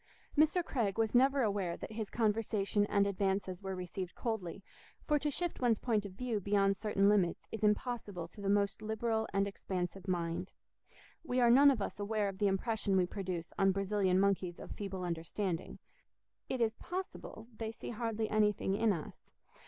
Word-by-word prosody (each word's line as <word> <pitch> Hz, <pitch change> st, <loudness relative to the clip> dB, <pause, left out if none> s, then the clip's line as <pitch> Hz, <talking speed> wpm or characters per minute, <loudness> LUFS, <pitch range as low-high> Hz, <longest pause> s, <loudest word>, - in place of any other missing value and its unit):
Mr. 315 Hz, +3 st, +4 dB
Craig 225 Hz, -, -1 dB
was 225 Hz, -1 st, +1 dB
never 265 Hz, +2 st, +4 dB
aware 200 Hz, -5 st, 0 dB
that -, -, -7 dB
his 220 Hz, -2 st, -4 dB
conversation 210 Hz, -2 st, +1 dB
and 200 Hz, -1 st, +3 dB
advances 195 Hz, -1 st, -1 dB
were 190 Hz, -1 st, -4 dB
received 180 Hz, 0 st, -5 dB
coldly, 200 Hz, -5 st, -3 dB, 0.4 s
for 300 Hz, -1 st, +2 dB
to 295 Hz, -, 0 dB
shift 345 Hz, +2 st, -3 dB
one's 235 Hz, -3 st, +3 dB
point 215 Hz, -4 st, 0 dB
of 190 Hz, -, -12 dB
view 230 Hz, +1 st, -2 dB
beyond 195 Hz, 0 st, +2 dB
certain 200 Hz, -1 st, +2 dB
limits 200 Hz, -4 st, +2 dB
is 225 Hz, -, -5 dB
impossible 210 Hz, -4 st, 0 dB
to 205 Hz, -, -13 dB
the 195 Hz, -, -1 dB
most 200 Hz, 0 st, +2 dB
liberal 220 Hz, +1 st, -1 dB
and 195 Hz, 0 st, +1 dB
expansive 190 Hz, -1 st, -4 dB
mind; 175 Hz, 0 st, -2 dB, 0.7 s
we 255 Hz, -5 st, 0 dB
are 240 Hz, -1 st, +6 dB
none 280 Hz, +4 st, +8 dB
of 240 Hz, -7 st, +1 dB
us -, -, -5 dB
aware 205 Hz, 0 st, 0 dB
of 195 Hz, -1 st, -5 dB
the 205 Hz, -, +3 dB
impression 200 Hz, 0 st, +1 dB
we 185 Hz, -, +4 dB
produce 180 Hz, -3 st, -5 dB
on 195 Hz, 0 st, +5 dB
Brazilian 195 Hz, -1 st, +1 dB
monkeys 190 Hz, -3 st, +1 dB
of -, -, -9 dB
feeble 195 Hz, -3 st, -5 dB
understanding—it 180 Hz, -, -5 dB
is 225 Hz, -2 st, +2 dB
possible 355 Hz, -, -6 dB
they 220 Hz, 0 st, -4 dB
see 225 Hz, -, -7 dB
hardly 225 Hz, -1 st, -2 dB
anything 210 Hz, -2 st, +2 dB
in 220 Hz, +2 st, +3 dB
us. 165 Hz, -6 st, -6 dB
205 Hz, 175 wpm, -34 LUFS, 190-225 Hz, 0.7 s, none